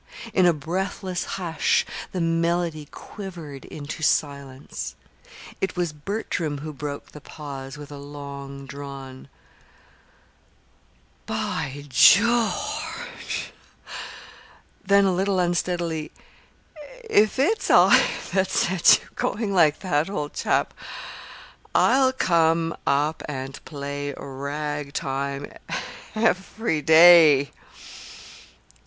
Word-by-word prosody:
In 185 -3 +4
a - - +6
breathless 180 +4 -3
hush 170 -3 +1 0.3
the 185 - -2
melody 165 -2 0
quivered 170 -9 -9
into 150 +1 -7
silence. 140 -3 -2 0.7
It 190 - -1
was 175 -3 -1
Bertram 160 -2 -3
who 155 +2 -7
broke 145 0 -6
the 150 - -11
pause 140 -3 -8
with 145 0 -10
a 145 - -8
long 140 -1 -8
drawn: 135 -1 -9 2.0
"By 140 +2 -3
George!" 235 - +2 1.3
Then, 200 0 +4
a 190 - +2
little 190 +2 0
unsteadily: 175 -3 -1 1.0
"If 215 - +3
it's 330 +12 +1
I - - +7 0.3
that 190 -1 +2
set 185 -2 +4
you - - -18
going 210 -1 -1
like 155 -5 +4
that, 165 -3 0
old 150 -7 -4
chap, - - 0 1.0
I'll 260 0 +4
come 165 -7 +2
up 150 +3 +1
and 135 -1 -6
play 145 -1 -5
ragtime 140 0 -4 0.6
every 215 -4 0
day!" 160 -3 +7
155 Hz, 95 wpm, -24 LUFS, 140-185 Hz, 2.0 s, I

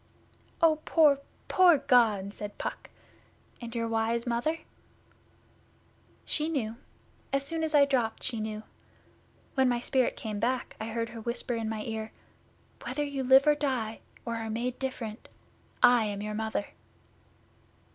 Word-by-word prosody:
'Oh, 315 -2 +6
poor 300 -4 +5 0.3
poor 360 -4 +6
God!' 225 -7 +3
said 205 -1 -7
Puck. - - -5 0.7
'And 235 0 -7
your 230 -1 0
wise 230 +1 0
Mother?' 250 +7 -1 1.6
'She 305 +1 -1
knew. 230 -8 -2 0.5
As 275 0 0
soon 325 +3 -2
as 315 -1 0
I 285 -1 +7
dropped 245 -5 0
she 230 - -1
knew. 215 0 -4 0.9
When 265 -2 +3
my 240 -1 +1
spirit 255 +1 +1
came 215 -2 -4
back 245 +3 -1
I - - -2
heard 230 0 -2
her 230 - -8
whisper 235 +2 -3
in 225 -2 -2
my 220 -1 -3
ear, 220 0 -4 0.7
"Whether 295 - -2
you 280 -2 -3
live 265 +1 +7
or 300 - +6
die, 255 -7 -2 0.3
or 230 -1 -2
are 225 -1 -4
made 240 +3 -2
different, 245 -4 -5 0.5
I 245 -2 +7
am 205 -1 -3
your 210 0 -3
Mother." 220 -1 -2
235 Hz, 145 wpm, -29 LUFS, 220-275 Hz, 1.6 s, I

